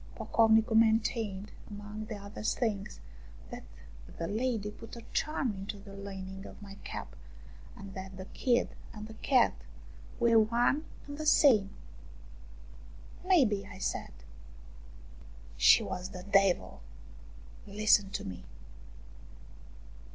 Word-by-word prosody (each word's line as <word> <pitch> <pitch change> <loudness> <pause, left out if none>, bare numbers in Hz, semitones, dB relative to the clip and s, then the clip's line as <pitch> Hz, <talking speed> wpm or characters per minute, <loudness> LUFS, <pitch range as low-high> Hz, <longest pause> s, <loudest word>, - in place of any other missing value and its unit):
Pocovnicu 225 0 +3
maintained, 220 -2 +2 0.2
among 210 +1 -7
other 200 -1 -7
things, 210 -2 -1 0.5
that - - -6 0.6
the 165 - -3
lady 220 -1 -1
put 230 +3 -11
a 235 - -9
charm 285 -7 0
into 195 +1 -6
the 200 0 -12
lining 195 -1 -7
of - - -12
my 200 -2 -10
cap, 65 - -7 0.6
and 195 -1 -10
that 190 0 -8
the 190 - -7
kid 245 +4 +1 0.2
and 210 -1 -7
the 220 - -10
cat 250 +2 +3 0.7
were 230 -1 +5
one 240 +7 +2 0.2
and 285 +1 -8
the 310 - -3
same. 225 -10 +6 1.5
May 360 -7 +5
be," 205 -3 0
1 200 -1 -11
said. - - -3 0.8
" - - -18 0.2
She 60 - +6
was 180 0 -4
the 180 -2 -8
devil, 195 - +2 0.9
listen 205 -1 +3
to 200 - -4
me." 90 -2 -7
205 Hz, 120 wpm, -31 LUFS, 195-225 Hz, 1.5 s, same